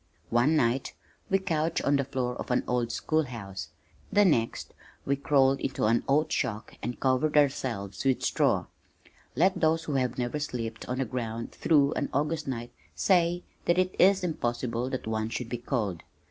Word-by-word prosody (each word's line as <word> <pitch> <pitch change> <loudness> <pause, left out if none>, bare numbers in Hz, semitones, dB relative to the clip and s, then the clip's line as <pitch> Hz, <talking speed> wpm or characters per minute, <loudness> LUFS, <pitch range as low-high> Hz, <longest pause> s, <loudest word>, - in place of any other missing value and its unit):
One 120 +7 +3
night 125 -2 +1 0.3
we 195 - +4
couched 165 -4 -1
on 140 0 +3
the 140 - +1
floor 130 -2 -2
of - - -6
an 125 - +2
old 120 -1 0
school 155 +6 0
house, 95 - -7 0.4
the 205 0 +5
next 115 -10 +1 0.3
we 140 - +2
crawled 135 -1 +3
into 130 - -1
an 115 +2 +3
oat 155 +3 +2
shock 110 -4 -2
and 120 +3 -4
covered 135 +3 +2
ourselves 115 -9 0
with 135 -2 +1
straw. - - +2 0.7
Let 185 +8 +3
those 160 0 +2
who 150 - -3
have 125 -3 0
never 125 +4 -2
slept 115 -6 -4
out - - -14
on - - -3
the 135 - 0
ground 115 -1 -4
through 145 -3 +3
an - - -2
August 150 +2 -1
night 120 -2 -4 0.2
say 175 -2 +2 0.2
that 170 - +3
it 185 0 +1
is 195 0 +5
impossible 120 -6 -2
that 130 -1 -4
one 110 0 -1
should 115 0 -4
be 120 - -3
cold! 110 - -2
130 Hz, 180 wpm, -28 LUFS, 120-155 Hz, 0.7 s, the